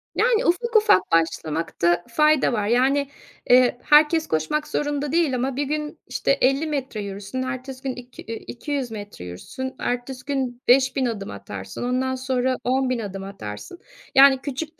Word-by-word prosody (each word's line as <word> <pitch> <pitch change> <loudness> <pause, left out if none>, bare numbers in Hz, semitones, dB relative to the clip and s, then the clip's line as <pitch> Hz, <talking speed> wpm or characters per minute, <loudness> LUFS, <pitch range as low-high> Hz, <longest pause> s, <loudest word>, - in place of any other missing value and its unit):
Yani 480 0 +2
ufak 465 +7 0
ufak 425 - +6
başlamakta 165 +1 +1
fayda 305 +1 +3
var. 210 -3 0
Yani, 265 +4 +2 0.4
eee, 250 -1 +5
herkes 310 +2 +5
koşmak 160 - -1
zorunda 290 -1 -2
değil 320 -5 +2
ama 255 +1 -1
bir 285 - 0
gün, 300 +1 -4
işte, - - 0
50 275 +4 +2
metre 270 -7 -3
yürürsün, 200 +4 -5
ertesi 260 0 -6
gün 265 -2 -3
iki 250 0 -11
eee, 230 - -5
200 270 -1 -4
metre 205 - -8
yürürsün, 260 - -7
ertesi 250 +2 -3
gün 260 -4 -2
5000 265 +1 +4
adım 210 -5 -4
atarsın, 100 - -7
ondan 255 +1 0
sonra 255 0 0
10000 255 -1 +1
adım 195 -3 -5
atarsın, 195 - -8 0.4
yani 270 0 +8
küçük 300 +4 -5
255 Hz, 155 wpm, -23 LUFS, 220-285 Hz, 0.4 s, yani